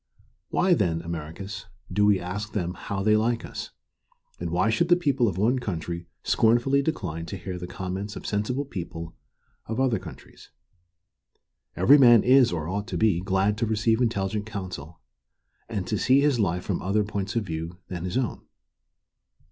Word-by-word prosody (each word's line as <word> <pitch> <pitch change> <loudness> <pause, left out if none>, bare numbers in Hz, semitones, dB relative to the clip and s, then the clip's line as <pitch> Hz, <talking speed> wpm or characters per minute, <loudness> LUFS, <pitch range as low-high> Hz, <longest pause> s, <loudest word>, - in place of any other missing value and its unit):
Why, 180 0 +3
then, 85 - +1
Americus, 85 +6 -6 0.3
do 105 +2 +3
we 100 -2 +4
ask 100 +4 -5
them 90 -4 -1
how 95 +1 -4
they 105 +1 +4
like 115 +2 +1
us? - - -6 0.7
And 85 - -3
why 90 +6 +2
should 170 +10 +2
the 175 - +7
people 140 -8 +1
of 95 -4 -2
one 120 +6 +2
country 85 -5 -4 0.2
scornfully 120 +5 +3
decline 90 - -3
to 100 - -5
hear 90 0 -6
the 90 - -6
comments 95 +3 -5
of - - -8
sensible 115 +7 -1
people 85 -8 -7 0.5
of 115 +2 -3
other 125 -6 +2
countries? - - -12 1.3
Every 145 +3 +6
man 120 -4 +7
is, 130 -1 +5
or 80 -3 -3
ought 100 +4 -3
to - - -3
be, 105 -6 +3
glad 95 +2 +1
to 115 - +1
receive 110 +2 +1
intelligent 105 -2 -1
counsel, 90 - -7 0.7
and 100 -5 -3
to 105 - -1
see 130 +2 +4
his 140 -3 +2
life 90 -3 0
from 95 - -2
other 105 +3 +1
points 100 0 -4
of 115 -3 0
view 80 0 -5
than 90 -2 -5
his 90 +6 -2
own. 130 -4 -2
105 Hz, 170 wpm, -26 LUFS, 90-115 Hz, 1.3 s, the